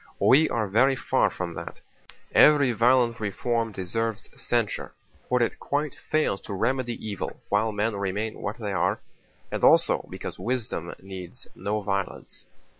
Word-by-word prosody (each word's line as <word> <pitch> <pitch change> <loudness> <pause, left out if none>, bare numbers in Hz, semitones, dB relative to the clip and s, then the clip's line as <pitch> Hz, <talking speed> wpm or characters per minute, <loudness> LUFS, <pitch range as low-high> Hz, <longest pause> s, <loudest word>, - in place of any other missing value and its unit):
We 155 +4 +5
are 110 -3 0
very 130 +7 +4
far - - +2
from 90 -2 -5
that. - - -8 0.5
Every 145 -4 +6
violent 120 +1 +3
reform 115 +2 -1
deserves 105 +3 -3
censure, - - -1 0.4
for 125 -1 +3
it - - -2
quite 145 0 -1
fails 155 -10 -1
to 100 - -6
remedy 120 +3 0
evil 100 -2 -5
while 110 0 +2
men 105 +1 -1
remain 100 +3 -3
what 105 +2 -3
they 105 -3 -3
are, 90 -1 +1 0.5
and - - -3
also - - +5
because - - -7
wisdom 115 -9 -3
needs 95 -2 -9
no 105 +1 -2
violence. 100 -1 -4
110 Hz, 145 wpm, -26 LUFS, 100-125 Hz, 0.5 s, Every